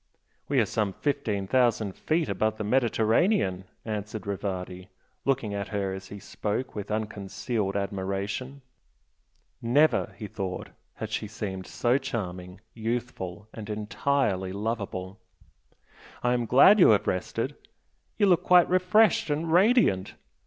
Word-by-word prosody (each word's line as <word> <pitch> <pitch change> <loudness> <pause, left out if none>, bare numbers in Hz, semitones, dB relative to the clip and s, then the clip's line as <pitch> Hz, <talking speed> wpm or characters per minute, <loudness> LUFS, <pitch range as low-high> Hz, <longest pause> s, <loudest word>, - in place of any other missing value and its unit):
"We - - +3
are - - +4
some 105 -3 -1
fifteen 110 -9 -1
thousand 110 -3 +1
feet 160 0 0
above 110 +2 0
the 110 - -3
Mediterranean" 115 - +2 0.2
answered 105 -1 -4
Rivardi, 95 -2 -4 0.4
looking 130 -6 0
at 100 -1 -3
her 100 -2 -2
as 95 0 -8
he 100 - -8
spoke 105 +6 -3
with 105 -1 -6
unconcealed 105 0 -3
admiration; 100 +7 -3 1.0
never, 140 +7 +3
he 110 - -6
thought, 95 -3 -5 0.3
had - - -6
she 105 - -2
seemed 95 -3 -5
so 125 +3 +1
charming, 90 -7 -5
youthful 110 -4 -4
and 110 -1 -8
entirely 105 -2 0
lovable 100 -2 -4 1.0
"I 125 0 +3
am 120 -2 0
glad 190 - +7
you - - +8
have - - +4
rested - - -2 0.6
you 210 - +4
look 180 -4 +4
quite 180 -1 +6
refreshed 185 +2 +3
and 160 +2 -1
radiant. 185 - +3
110 Hz, 130 wpm, -27 LUFS, 100-130 Hz, 1.0 s, you